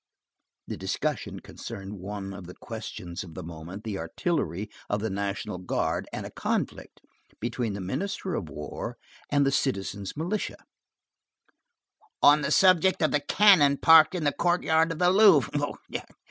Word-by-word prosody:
The - - -6
discussion - - -3
concerned 100 -3 -8
one 100 +1 -6
of 95 -3 -9
the 90 - -10
questions 85 0 -7
of 85 -4 -12
the 90 - -6
moment, 85 +5 -8
the 105 -3 -4
artillery 95 - -2 0.2
of 105 - 0
the 110 0 -2
National 100 -2 -3
Guard, 90 - -2
and - - -5
a - - -8
conflict - - -3 0.4
between 120 -1 -2
the 100 - -5
Minister 190 - -3
of 85 - -3
War 75 0 -6 0.3
and 145 -1 +3
"the 135 - +2
citizen's 100 -6 -2
militia," 180 +7 -2 1.6
on 145 +1 +6
the 140 - -1
subject 185 +1 +4
of 155 - +3
the 145 - +2
cannon 145 -3 +5
parked 160 +3 +7
in 175 - -2
the 145 - +2
courtyard 165 -1 +2
of 165 - -4
the 180 +1 +4
Louvre. 190 - +4
120 Hz, 150 wpm, -27 LUFS, 95-165 Hz, 1.6 s, parked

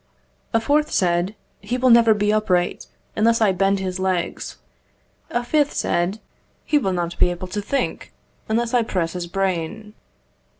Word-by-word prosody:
A 225 - +3
fourth 295 +6 +1
said 175 +2 +1 0.2
"He 250 - -3
will 255 0 +4
never 230 -2 +6
be 210 0 +1
upright, 185 -5 0 0.3
unless 230 +2 +3
I 215 -3 +4
bend 195 +2 +2
his 190 -1 -3
legs." 185 -2 -2 0.7
A 240 - -1
fifth 290 +3 +1
said 175 +5 0 0.5
"He 295 - +3
will 195 -8 -1
not 175 -1 -3
be - - +4
able 180 +1 -5
to 205 +3 -3
think, 275 +7 -2 0.4
unless 230 +2 0
I 245 - +4
press 180 -7 -2
his 180 -1 -4
brain." 195 +3 -2
200 Hz, 160 wpm, -22 LUFS, 180-230 Hz, 0.7 s, never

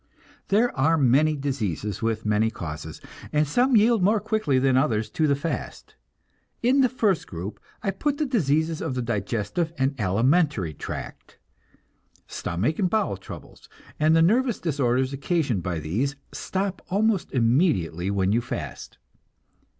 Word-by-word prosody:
There 225 +5 +2
are 155 +4 +3
many 145 +3 +3
diseases 105 - -3
with 110 -1 -1
many 105 +1 +2
causes, 80 -6 -7 0.3
and 150 0 +2
some 245 - +3
yield 220 0 +4
more 210 +4 +3
quickly 215 - 0
than 130 0 +3
others 115 -5 +1
to 155 - +1
the 140 - +3
fast. 140 +4 -5 0.7
In 260 +3 +4
the 255 - +4
first 210 -8 0
group 90 +4 -6 0.2
I 195 - +1
put 285 +9 -1
the 305 - 0
diseases 160 - 0
of 150 -6 -3
the 125 - -1
digestive 115 - -2
and 135 +1 +1
alimentary 115 - +2
tract. - - -8 0.9
Stomach 105 - -2
and 185 -3 +2
bowel 215 - 0
troubles, 95 - -12 0.3
and 155 +1 +4
the 165 - +5
nervous 235 +6 +2
disorders 130 -4 0
occasioned 140 - 0
by 90 -1 -3
these, 105 - -2 0.2
stop 195 0 -3
almost 205 0 +1
immediately 115 - +1
when 100 -1 +1
you 115 +3 +2
fast. 125 - -6
140 Hz, 145 wpm, -25 LUFS, -, 0.9 s, the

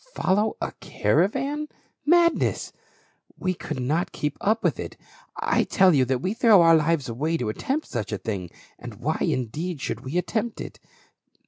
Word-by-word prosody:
Follow 210 +4 +1
a - - -3
caravan? 265 - 0 0.4
Madness! 340 +1 +3 0.6
We 185 -1 -1
could 170 - -6
not 150 +8 0
keep 150 -1 -3
up 220 +2 +1
with - - +1
it. - - -6 0.4
I - - +2
tell 190 -2 +4
you 135 -3 +4
that 130 0 -1
we 190 - 0
throw 225 -6 +6
our 165 0 +7
lives 160 -2 +1
away 150 +8 -1
to 120 -7 -2
attempt 275 - -2
such 110 -4 -4
a 105 - -1
thing; 95 -2 -4 0.3
and - - -8
why, - - -2
indeed, 150 +7 -2
should 115 - -3
we 135 +6 -3
attempt 220 +5 -2
it? - - -8
165 Hz, 165 wpm, -25 LUFS, 130-215 Hz, 0.6 s, our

